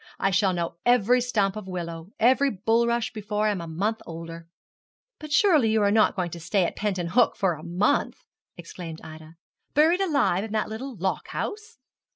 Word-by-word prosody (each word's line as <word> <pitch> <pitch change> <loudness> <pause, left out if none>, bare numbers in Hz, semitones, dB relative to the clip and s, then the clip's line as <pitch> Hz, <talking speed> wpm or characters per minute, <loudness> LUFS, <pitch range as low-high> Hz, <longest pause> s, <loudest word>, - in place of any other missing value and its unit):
I 195 - +1
shall 195 +1 +3
know 170 -1 -3
every 245 0 +4
stump 210 -5 0
of 215 -3 -7
willow 170 -2 -6
every 260 +4 +4
bulrush 230 +2 +1
before 210 -1 -2
I 215 - +3
am 195 -4 -3
a 170 - -7
month 205 +8 -2
older.' 165 0 -8 0.7
'But 305 -1 -9
surely 300 - +4
you 220 -1 +2
are 200 - +3
not 215 0 +3
going 180 -3 -2
to 170 - -7
stay 185 +3 +1
at - - -4
Penton 185 -5 -2
Hook 235 +7 +3
for 190 -4 +1
a 155 - -9
month!' 180 - 0 0.3
exclaimed 170 -1 -8
Ida, 160 +1 -11 0.4
'buried 325 +6 +4
alive 280 - +1
in 220 -1 -6
that 215 -1 -1
little 245 +4 -6
lock 190 +2 -2
house?' 435 +1 -5
210 Hz, 190 wpm, -25 LUFS, 175-235 Hz, 0.7 s, every